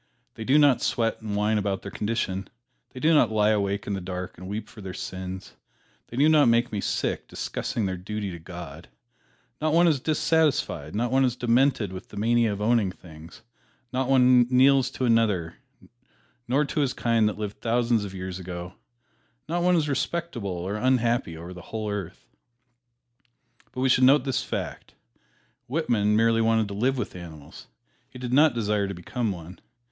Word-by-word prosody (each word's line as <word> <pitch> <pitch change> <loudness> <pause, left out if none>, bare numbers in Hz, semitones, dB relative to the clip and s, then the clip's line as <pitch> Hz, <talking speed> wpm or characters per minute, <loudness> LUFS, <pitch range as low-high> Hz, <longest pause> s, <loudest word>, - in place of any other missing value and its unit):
They 110 - -7
do 135 +5 +4
not 145 -4 +5
sweat 115 -1 0
and 105 -2 -4
whine 105 +1 +1
about 100 -1 -2
their 100 - -7
condition, 100 -3 -2 0.4
They 130 - -10
do 160 +4 +3
not 135 -8 +5
lie 105 0 +3
awake 100 -1 0
in 100 - -3
the 95 - -3
dark 90 0 -6
and 90 +2 -10
weep 105 +2 -5
for 110 - -13
their 95 -1 -7
sins, 95 0 -6 0.5
They 120 - -9
do 145 +3 +5
not 155 -3 +5
make 120 +1 +3
me 105 -2 -2
sick - - -2
discussing 115 - -3
their 95 -1 -2
duty 100 +2 -4
to 85 - -8
God, 85 -3 -9 0.7
Not 155 0 +1
one 170 +1 +5
is 155 -5 +2
dissatisfied, 150 - 0
not 120 +3 0
one 135 +1 +3
is 125 -2 +1
demented 120 -4 +2
with 95 - -9
the - - -11
mania 115 +1 +2
of 100 - -4
owning 110 -3 +2
things, 85 +3 -14 0.5
Not 130 +1 -1
one 125 -2 +5
kneels 130 0 +4
to 130 - -2
another, 105 -8 +1 0.9
nor 140 +5 +2
to 145 - -3
his 140 -3 +1
kind 115 -2 +2
that 105 - -6
lived 105 -1 -6
thousands 115 -1 +1
of 95 -1 -7
years 95 0 -5
ago, 90 0 -7 0.7
Not 170 +2 -1
one 180 +1 +3
is 155 -3 +1
respectable 145 -5 -2
or 90 +3 -3
unhappy 120 -7 +1
over 85 +3 -8
the 90 - -10
whole 110 -2 -3
earth. 100 -4 -6 1.5
But 130 - -5
we 130 - +2
should 130 0 +5
note 135 0 +6
this 130 -1 -1
fact: - - -6 0.7
Whitman 120 -8 +1
merely 115 +1 +3
wanted 110 -1 +2
to - - -5
live 130 +6 0
with 125 - -4
animals 80 -5 -11 0.4
he - - -12
did 125 -1 -4
not 145 -1 +5
desire 105 -3 0
to 100 - -5
become 110 +6 -3
one. 90 0 -9
110 Hz, 185 wpm, -26 LUFS, 95-130 Hz, 1.5 s, note